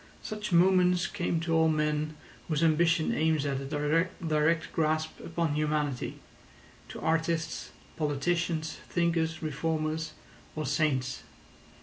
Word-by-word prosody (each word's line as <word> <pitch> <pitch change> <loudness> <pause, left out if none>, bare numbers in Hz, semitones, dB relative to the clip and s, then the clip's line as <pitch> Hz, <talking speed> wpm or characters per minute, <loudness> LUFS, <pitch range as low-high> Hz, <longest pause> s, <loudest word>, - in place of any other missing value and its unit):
Such 210 -1 -5
moments 180 0 +4
come 175 -4 -1
to 165 0 -1
all 160 0 +4
men 150 0 0 0.3
whose 155 -1 0
ambition 165 0 +3
aims 155 -2 +1
at 135 -1 -1
a - - -5 0.5
direct 155 0 +1
grasp 155 0 0
upon 165 -2 -1
humanity—to 150 -3 -4
artists, 160 0 -1 0.3
politicians, 160 +2 -1
thinkers, 165 -2 0
reformers, 155 +1 -2 0.4
or 155 0 -2
saints. 135 -2 0
160 Hz, 105 wpm, -29 LUFS, 150-165 Hz, 0.5 s, moments